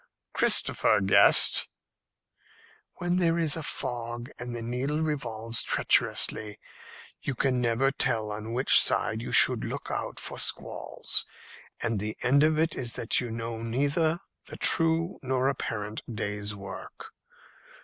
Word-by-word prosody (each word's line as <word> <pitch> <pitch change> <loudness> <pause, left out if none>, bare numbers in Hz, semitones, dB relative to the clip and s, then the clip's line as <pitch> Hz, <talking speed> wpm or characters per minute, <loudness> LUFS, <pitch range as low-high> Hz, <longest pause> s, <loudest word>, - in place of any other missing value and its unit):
"Christopher - - +3
guessed." 95 0 +5 1.3
"When 175 0 -2
there 170 -2 +1
is 160 -3 +2
a 165 - -5
fog 120 -2 -5
and 120 0 -6
the 115 - -6
needle 130 +6 -3
revolves 115 -7 -3
treacherously, 105 -1 +1 0.6
you 135 - -4
can 125 0 0
never 120 +3 +1
tell 110 -5 0
on 110 +2 -6
which 130 +3 +6
side 110 -1 +1
you 120 - -6
should - - +5
look - - -5
out - - -4
for - - -6
squalls, - - -2 0.6
and 115 -2 -1
the 105 +2 -4
end 140 +3 +3
of 155 0 +2
it 160 0 0
is 120 -3 -2
that 115 - 0
you 120 - -5
know 115 0 -6
neither 145 +8 0 0.3
the - - -9
true 165 +1 +2
nor 130 0 -1
apparent 110 -5 -4
day's 105 -1 -4
work. 100 -1 -10
120 Hz, 140 wpm, -27 LUFS, 115-145 Hz, 1.3 s, which